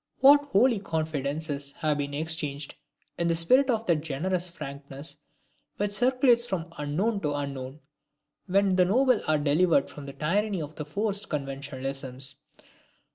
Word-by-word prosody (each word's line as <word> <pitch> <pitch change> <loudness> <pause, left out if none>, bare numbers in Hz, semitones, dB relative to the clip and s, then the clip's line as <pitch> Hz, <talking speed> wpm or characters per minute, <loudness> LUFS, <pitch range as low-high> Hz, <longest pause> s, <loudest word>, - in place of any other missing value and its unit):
What 285 +2 +7
holy 240 -3 +3
confidences 150 -4 -2
have 150 -2 -1
been 145 0 -3
exchanged 150 -2 -2 0.5
in 170 - +2
the 165 - +2
spirit 255 +12 +3
of 225 -2 +1
that 170 -5 +3
generous 175 +5 -1
frankness 140 -1 -7 0.6
which 205 0 -1
circulates 245 +1 +4
from 170 -4 -4
unknown 185 +10 0
to 150 -2 -1
unknown, 140 0 -5 0.7
when 195 0 +2
the 180 - +5
noble 250 +4 +3
are 155 0 +3
delivered 150 +1 +2
from 145 -1 -9
the 140 - -7
tyranny 195 +7 0
of 150 -1 -6
forced 205 +4 -2
conventionalisms! 135 -1 -4
160 Hz, 135 wpm, -27 LUFS, 140-200 Hz, 0.7 s, What